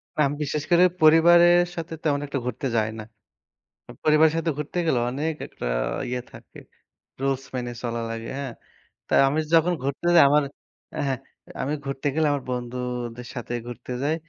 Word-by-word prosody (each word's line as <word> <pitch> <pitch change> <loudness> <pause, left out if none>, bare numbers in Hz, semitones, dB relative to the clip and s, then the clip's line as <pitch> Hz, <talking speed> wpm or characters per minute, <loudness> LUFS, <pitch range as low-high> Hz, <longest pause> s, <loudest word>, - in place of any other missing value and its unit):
না - - -7
আমি 140 - -3
বিশেষ 150 +1 -2
করে 175 +1 +6 0.2
পরিবারের 170 +2 +7 0.2
সাথে 165 0 -5
তেমন 145 -2 +1
একটা 140 -1 -2
ঘুরতে 125 +3 -3
যাই 110 -1 +2
না। - - -5 0.9
উ - - -7
পরিবারের 155 0 +5
সাথে 165 0 0
ঘুরতে 150 +4 -5
গেলে 130 -7 +2
অনেক 150 +5 -2
একটা - - -8 0.4
ইয়ে 125 0 -2
থাকে। - - -13 0.6
rules 135 -1 0
মেনে 120 -1 -3
চলা 120 -1 -2
লাগে, 115 0 -5
হ্যাঁ? 135 -4 -5 0.5
তাই - - +3
আমি 150 +3 +1
যখন 165 +2 +5
ঘুরতে 140 +5 -2
যাই 170 - +9
আমার 150 +1 +4 0.6
হ্যাঁ, 135 -1 0 0.4
আমি 140 +3 -1
ঘুরতে 135 +1 -3
গেলে 155 -1 +2
আমার 140 -2 -2
বন্ধুদের 125 -1 -4
সাথে 120 0 -5
ঘুরতে 120 +1 -8
যাই। 150 +3 +1
140 Hz, 170 wpm, -24 LUFS, 125-160 Hz, 0.9 s, যাই